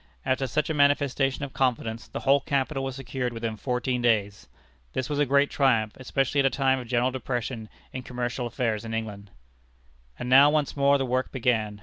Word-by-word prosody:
After 130 +1 0
such 150 +5 0
a - - 0
manifestation 140 -1 +2
of 135 - -11
confidence, 115 -3 -1
the - - -6
whole 140 +1 +4
capital 135 0 -1
was 135 -1 -4
secured 125 -2 -4
within 115 -1 -3
fourteen 125 +1 -2
days. 105 -3 0 0.5
This 130 +2 -3
was 145 - -1
a 145 - +2
great 140 +2 +3
triumph, 115 -6 +2
especially 135 +2 -1
at 140 - +4
a - - +2
time 135 -1 +1
of 125 - -8
general 125 +1 +1
depression 125 -3 -4 0.2
in 130 - -4
commercial 125 0 -3
affairs 115 -2 -2
in 115 0 -4
England. 105 -3 -5 0.9
And - - -5
now 135 +3 +7
once 150 -1 0
more 140 0 +4
the 135 - -1
work 130 +1 -1
began. 110 -5 0
130 Hz, 195 wpm, -26 LUFS, 115-135 Hz, 0.9 s, now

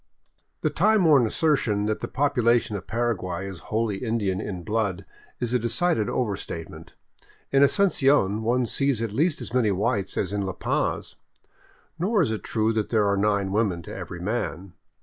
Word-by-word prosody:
The 155 - 0
time 200 +5 +3
worn 140 -7 +5
assertion 115 -8 +1
that 110 0 -1
the - - -4
population 120 -6 +1
of 100 - -6
Paraguay 100 -6 -2
is 95 -3 -8
wholly 110 -2 0
Indian 105 -4 -1
in 95 -5 -5
blood 100 -2 -1 0.3
is 120 -1 -2
a 125 - +3
decided 115 - +1
overstatement. 100 -8 -4 0.6
In 135 - +4
Asuncion 140 - +3
one 120 +3 +1
sees 135 -2 0
at 115 - -3
least 150 - 0
as - - -7
many 125 -4 +3
whites 100 0 -1
as 95 0 -1
in 105 - -1
La 95 -1 -3
Paz. - - -2 0.8
Nor 200 +2 +2
is 130 - -1
it 110 - -4
true 110 0 0
that 110 -1 -1
there 110 -3 +2
are 100 - +2
nine 100 -1 +1
women 100 -5 0
to - - -8
every 85 - -7
man. 95 -2 -3
110 Hz, 170 wpm, -25 LUFS, 100-130 Hz, 0.8 s, worn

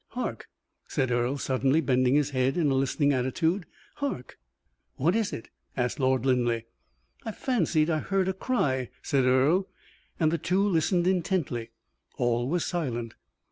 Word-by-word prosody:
"Hark!" - - -4 0.4
said 130 -2 -1
Earle, 120 +3 +1
suddenly 135 +2 +1
bending 130 -2 +2
his 145 -1 +2
head 130 +2 +1
in 155 -5 +2
a - - +2
listening 135 +2 +2
attitude. 160 +8 0 0.3
"Hark!" 280 - -4 0.6
"What 170 +8 +2
is 225 -3 0
it?" 115 - -7 0.3
asked 125 +1 -1
Lord 130 -1 +2
Linleigh. 120 -3 +2 0.6
"I 225 - -4
fancied 175 - +1
I 155 - +1
heard 195 +2 0
a 190 - +1
cry," 135 - 0
said 135 -4 +2
Earle, 140 +9 +3 0.5
and 155 -1 +3
the 170 - 0
two 190 +6 +1
listened 175 0 +2
intently. 175 -10 0 0.5
All 120 +1 +1
was 175 +1 0
silent. 120 -10 -3
140 Hz, 150 wpm, -27 LUFS, 130-175 Hz, 0.6 s, Earle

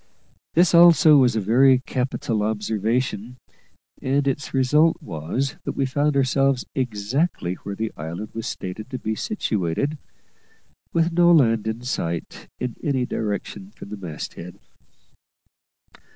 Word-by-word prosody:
This 175 +1 +4
also 170 -3 +7
was 125 -3 +4
a - - +1
very 130 +6 +5
capital 125 -4 -2
observation; 110 +3 -2 0.6
and 140 +1 0
its 135 0 -2
result 150 +5 +3
was 85 - -3
that - - -3
we 135 - 0
found 145 +2 0
ourselves 135 -1 +2
exactly 120 - -1
where 100 0 -6
the 110 +1 -3
island 85 +7 -6
was 115 -1 -5
stated 100 +6 -6
to 130 - -4
be 110 -3 -3
situated, 115 - -2 0.9
with 165 +1 +1
no 175 +1 +4
land 115 -9 +4
in 110 +2 -3
sight 85 -9 -4
in 125 -2 -4
any 135 -4 0
direction 100 -3 -4
from - - -11
the 105 - -5
mast 85 -6 -7
head. 90 +1 -10
125 Hz, 135 wpm, -23 LUFS, 105-140 Hz, 0.9 s, also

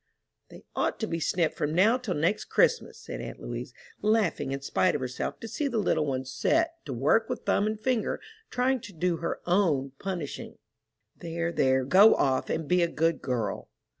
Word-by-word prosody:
"They - - -13
ought - - 0
to 220 - 0
be 165 - -2
snipped 165 0 +1
from 150 +1 -2
now 220 +8 +4
till 225 -8 -3
next 170 +8 0
Christmas," 485 -1 +2
said - - -7
aunt - - -7
Louise, - - -6 0.3
laughing 210 -10 +1
in 135 0 -3
spite 180 +5 +1
of 145 - -2
herself 130 0 -4
to 230 - -5
see 290 +6 -2
the 240 -4 -2
little 175 -7 +1
one 130 -1 -2
set 330 - 0
to 145 - -5
work 150 - +2
with 250 - -4
thumb 205 - +2
and 215 0 -2
finger, 240 -1 0 0.3
trying 255 +1 +1
to 205 - -11
do 175 0 0
her 170 - -3
own 165 -8 +2
punishing. 180 -7 -5 0.6
"There, 170 0 -3
there, 130 -4 +2
go 195 +10 +7
off, 130 -1 +1
and 160 -2 -2
be 180 +3 +3
a 170 - +3
good 165 0 0
girl." 115 -6 -3
170 Hz, 195 wpm, -28 LUFS, 145-220 Hz, 0.6 s, go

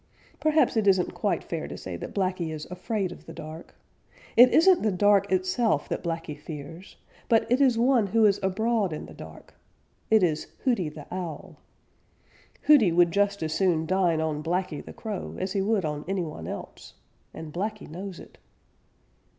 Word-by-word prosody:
Perhaps 310 -3 +3
it 215 -2 +1
isn't 190 -2 +3
quite - - -1
fair - - -4
to - - -7
say - - -6
that - - -8
Blacky 185 -4 -1
is 155 -1 -6
afraid 195 0 -2
of - - -12
the - - -8
dark. 155 +2 -10 0.6
It 245 +1 +8
isn't 360 +2 +5
the 215 - +1
dark 200 +1 +3
itself 185 - +1
that - - -3
Blacky 165 -3 -4
fears, 155 +4 -10 0.3
but 225 -1 +4
it 255 +3 +3
is 255 -4 +4
one 240 -3 +3
who 220 +3 +3
is 200 -1 +3
abroad 200 0 0
in 155 - -6
the - - -12
dark. - - -12 0.6
It 220 -3 +5
is 160 -3 0 0.2
Hooty 230 - +1
the 150 -1 -11
Owl. 175 -2 -6 1.1
Hooty 270 - +6
would 170 0 +4
just 200 -1 +1
as 155 0 -2
soon 170 -3 +1
dine 175 -2 +2
on 155 -2 -2
Blacky 170 -1 -2
the - - -10
Crow 215 -4 -6
as 185 0 -3
he 195 - 0
would 200 -2 +1
on 150 -1 -3
any 190 -1 -1
one 150 - -7
else, - - -8 0.4
and 160 -2 -9
Blacky 210 +4 -4
knows 185 +3 -7
it. - - -15
185 Hz, 180 wpm, -26 LUFS, 165-215 Hz, 1.1 s, It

